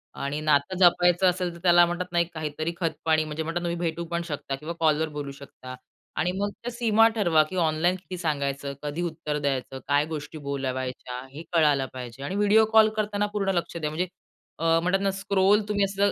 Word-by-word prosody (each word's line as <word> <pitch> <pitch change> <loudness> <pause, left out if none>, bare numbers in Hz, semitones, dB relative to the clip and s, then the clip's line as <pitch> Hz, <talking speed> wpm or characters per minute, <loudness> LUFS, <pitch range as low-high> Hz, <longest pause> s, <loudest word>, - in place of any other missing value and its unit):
आणि 140 +2 -3
नातं 150 +4 +2
जपायचं 175 0 +5
असेल 180 -1 -2
तर - - -11
त्याला 175 -1 +6
म्हणतात 175 +1 -3
नाही 170 0 +2
एक 170 - -22
काहीतरी 155 +1 -3
खतपाणी, 160 -2 +1
म्हणजे 155 +1 -4
म्हणतात 165 +2 -3
ना 175 - -2
तुम्ही 170 - -2
भेटू 170 +1 -5
पण 170 0 0
शकता 145 -3 -4
किंवा 155 +5 -6
कॉलवर 160 0 +2
बोलू 145 -1 -4
शकता. 135 -2 -11 0.4
आणि 180 - 0
मग 205 +1 0
त्या 240 +4 -7
सीमा 225 -2 +4
ठरवा 170 -8 +4
की 185 - -6
ऑनलाईन 170 +1 +2
किती 185 0 -8
सांगायचं, 140 -4 -2
कधी 150 +3 -3
उत्तर 160 -3 -3
द्यायचं, 135 -2 -2
काय 145 +1 +3
गोष्टी 155 0 -6
बोलावायच्या 130 -3 -4
हे 155 +4 -8
कळायला 150 -5 +3
पाहिजे. 125 0 -8
आणि 165 +7 -3
व्हिडिओ 210 +2 +5
कॉल 220 -1 +7
करताना 205 -1 0
पूर्ण 200 -2 0
लक्ष 170 0 -2
द्या. 155 -2 -2
म्हणजे, 170 +4 -2 0.5
अ, 165 0 +3
म्हणतात 190 +2 +1
ना, 195 0 +1
स्क्रोल 200 +1 +3
तुम्ही 205 -1 +1
असं 200 +1 +1
165 Hz, 200 wpm, -26 LUFS, 145-185 Hz, 0.5 s, कॉल